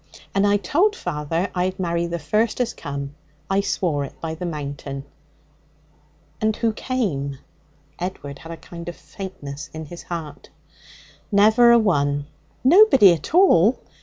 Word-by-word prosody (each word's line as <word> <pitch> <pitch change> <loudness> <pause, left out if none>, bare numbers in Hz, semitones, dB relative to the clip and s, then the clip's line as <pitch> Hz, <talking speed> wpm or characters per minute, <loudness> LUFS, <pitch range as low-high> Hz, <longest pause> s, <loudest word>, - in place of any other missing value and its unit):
And 200 +1 +3
I 205 0 +4
told 345 - +2
father 165 +3 -2
I'd 185 +1 -1
marry 170 -1 -1
the 170 0 -3
first 210 +10 0
as 245 -2 0
come. 140 -1 -6 0.4
I 195 +1 +3
swore 170 -7 -1
it 140 - -9
by 160 -1 -4
the 175 +2 -5
Mountain.' 140 -3 -5 1.4
'And 215 0 +1
who 225 -1 0
came?' 165 - -2 0.6
Edward 145 -6 -5
had 165 - -10
a 165 - -6
kind 170 +1 -9
of 175 - -8
faintness 150 -7 -8
in 160 0 -6
his 170 +3 -9
heart. 160 -4 -7 0.8
'Never 220 +4 +6
a 235 - +7
one.' 145 -9 +1 0.4
'Nobody 270 - +7
at 170 - -5
all?' 250 - +5
175 Hz, 145 wpm, -22 LUFS, 150-210 Hz, 1.4 s, a